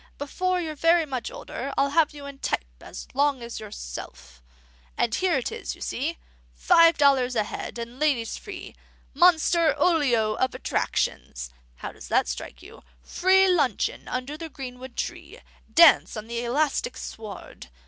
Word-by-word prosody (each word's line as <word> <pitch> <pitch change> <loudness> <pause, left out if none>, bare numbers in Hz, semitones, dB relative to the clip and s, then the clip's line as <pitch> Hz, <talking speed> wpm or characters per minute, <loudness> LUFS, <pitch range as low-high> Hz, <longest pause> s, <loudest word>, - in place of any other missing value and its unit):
'Before 365 +6 -1
you're 320 -3 -3
very 330 +2 +3
much 255 -5 -4
older, 270 +3 -6
I'll 280 0 +2
have 310 0 +3
you 290 -2 -10
in 280 -1 -9
type - - -1 0.2
as - - -9
long 275 -2 +1
as 235 0 -6
yourself.' 60 - -9 0.6
And 230 - +1
here 370 +4 +1
it 255 - -3
is, 450 - -5
you - - -19
see.) 310 +7 -3 0.4
'Five 335 - +5
dollars 270 -3 +3
a 215 - +2
head, 210 - -6
and 235 +2 -7
ladies 275 -7 +1
free. - - -9 0.4
MONSTER 335 +1 +4
OLIO 255 -11 +2
OF 260 - 0
ATTRACTIONS.' - - -2 0.2
(How - - -7
does - - -12
that - - +2
strike - - -6
you?) - - -13 0.2
'Free 380 +1 +4
luncheon 290 - 0
under 255 +4 -4
the 325 0 -7
greenwood 255 -2 -9
tree. - - -5 0.3
Dance 335 -8 +6
on 215 - -6
the 235 +1 -4
elastic 295 - 0
sward. 205 - -9
275 Hz, 160 wpm, -25 LUFS, 235-330 Hz, 0.6 s, Dance